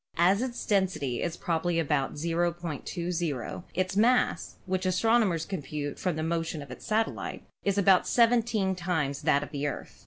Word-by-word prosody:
As 185 +5 +4
its 250 -2 -3
density 170 - 0
is 170 -1 -2
probably 170 0 0
about 150 -4 0
0.20, 170 -2 -2
its 185 +1 0
mass, 245 +4 +2
which 185 0 -1
astronomers 185 -3 +2
compute 150 -5 -4
from 180 -4 -1
the 155 - -2
motion 165 -2 -2
of 140 - -12
its 125 - -9
satellite, 220 +1 -1 0.2
is 200 -1 +1
about 195 -2 +5
seventeen 230 -5 +3
times 165 -6 -1
that 140 +1 +3
of 145 - -9
the 145 -1 -2
Earth. 145 - -6
175 Hz, 155 wpm, -28 LUFS, 155-195 Hz, 0.2 s, about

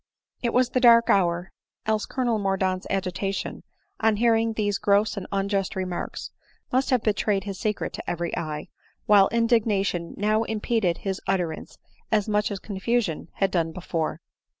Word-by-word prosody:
It 235 - 0
was 250 0 +3
the 255 - +2
dark 235 -2 +6
hour, 175 -1 +1 0.3
else 215 -1 0
Colonel 240 -4 0
Mordaunt's 190 -2 0
agita 195 0 -1
tion, - - -5 0.4
on 220 -1 +3
hearing 225 0 +2
these 205 -2 0
gross 205 +2 +2
and 200 - -5
unjust 195 -1 -1
remarks, 185 -2 -4 0.4
must 260 +2 +1
have 250 -4 +2
betrayed 205 -2 +1
his 195 -2 -6
secret 210 -1 -2
to - - -6
every 175 0 -2
eye; 155 -3 -4 0.4
while 200 -2 +6
indignation 215 -7 +1
now 215 +2 +2
impeded 220 -5 0
his 195 -1 -4
utterance 175 -4 -2 0.3
as 215 -1 +2
much 210 0 +1
as 200 - -3
confusion 200 -3 -1
had 195 - 0
done 165 -2 0
before. 165 -2 -3
200 Hz, 155 wpm, -25 LUFS, 185-225 Hz, 0.4 s, dark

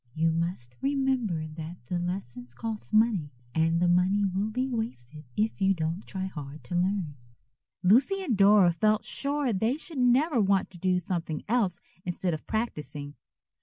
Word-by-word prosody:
"You 165 +1 +2
must 165 -8 -3
remember 265 - 0
that 155 -2 -8
the 175 +8 -2
lessons 125 -10 -5
cost 225 -3 -5
money, 215 -8 +3 0.2
and 165 +2 +2
the 175 - +3
money 185 +3 +3
will 195 +3 -1
be 255 +4 -1
wasted 160 - -4
if 215 -1 0
you 195 0 +4
don't 165 +3 -3
try 190 -1 -3
hard 150 -5 -8
to 125 - -8
learn." 180 -5 0 0.7
Lucy 270 - +4
and 260 -11 0
Dora 200 -2 +6
felt 215 +6 +2
sure 280 -3 0
they 225 +8 +1
should 315 -2 -6
never 250 +2 +4
want 195 -1 +2
to 175 - -11
do 185 0 +2
something 170 -3 -3
else 205 -6 +1 0.2
instead 175 0 -2
of 155 - -6
practising. 150 - -3
190 Hz, 165 wpm, -28 LUFS, 165-225 Hz, 0.7 s, Dora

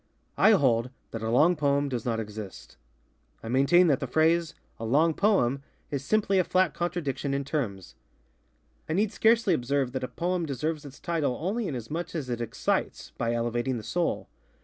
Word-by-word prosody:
I 220 - +7
hold 125 - +2 0.2
that 115 - -5
a 110 - -2
long 155 +10 +4
poem 140 -1 +1
does 125 -5 -4
not 115 -2 0
exist. 105 -2 -8 0.7
I 115 - -6
maintain 140 +8 +5
that 145 -5 +3
the 135 - -3
phrase, 165 +4 +2 0.2
ŌĆ£a 115 0 -4
long 160 +6 +4
poem, 150 - +2
ŌĆØ - - -23 0.3
is 140 -2 -2
simply 200 +3 +2
a - - +4
flat 185 +1 +2
contradiction 150 -6 -2
in 140 0 -2
terms. 110 - -3 1.0
I - - 0
need 205 +4 +1
scarcely 225 -3 +3
observe 135 -2 0
that 130 0 -4
a - - -1
poem 175 +1 -2
deserves 150 +3 -3
its 140 0 -11
title 155 -7 -1
only 200 +6 -2
inasmuch 160 +6 -5
as 135 -6 -3
it 120 -1 -2
excites, 115 -1 -2
by 115 0 0
elevating 120 +2 -1
the 110 - -7
soul. 170 +10 -1
140 Hz, 180 wpm, -27 LUFS, 120-175 Hz, 1.0 s, I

